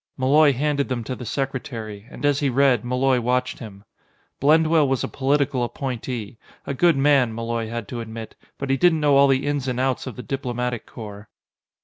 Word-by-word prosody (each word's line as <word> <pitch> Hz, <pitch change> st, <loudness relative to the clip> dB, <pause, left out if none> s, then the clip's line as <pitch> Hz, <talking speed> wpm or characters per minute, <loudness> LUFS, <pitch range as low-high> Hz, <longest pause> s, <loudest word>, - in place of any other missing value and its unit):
Malloy 145 Hz, +3 st, +5 dB
handed 140 Hz, +1 st, 0 dB
them 125 Hz, -2 st, -2 dB
to 130 Hz, -, -4 dB
the 125 Hz, -, -8 dB
secretary, 115 Hz, -6 st, -4 dB
and -, -, -6 dB
as 145 Hz, -1 st, +3 dB
he 145 Hz, -, +1 dB
read, 130 Hz, -3 st, +3 dB
Malloy 125 Hz, +1 st, +1 dB
watched 125 Hz, +2 st, -1 dB
him. 100 Hz, -4 st, -10 dB, 0.6 s
Blendwell 155 Hz, +1 st, +4 dB
was 135 Hz, -1 st, 0 dB
a -, -, -1 dB
political 140 Hz, -1 st, 0 dB
appointee 120 Hz, -2 st, -5 dB, 0.3 s
a 140 Hz, -, -3 dB
good 165 Hz, +2 st, +3 dB
man, 135 Hz, -5 st, +3 dB
Malloy 115 Hz, -1 st, -3 dB
had 115 Hz, -2 st, -5 dB
to 120 Hz, -, -4 dB
admit, 110 Hz, 0 st, -8 dB, 0.2 s
but 140 Hz, -1 st, -3 dB
he 135 Hz, -, +2 dB
didn't 165 Hz, +1 st, +4 dB
know 145 Hz, -2 st, +3 dB
all 140 Hz, 0 st, +6 dB
the 135 Hz, 0 st, +2 dB
ins 145 Hz, -2 st, -1 dB
and 125 Hz, -1 st, -2 dB
outs 130 Hz, 0 st, -1 dB
of 130 Hz, -, -6 dB
the 125 Hz, -, -8 dB
Diplomatic 125 Hz, -3 st, -3 dB
Corps. 105 Hz, -2 st, -10 dB
130 Hz, 195 wpm, -23 LUFS, 120-140 Hz, 0.6 s, all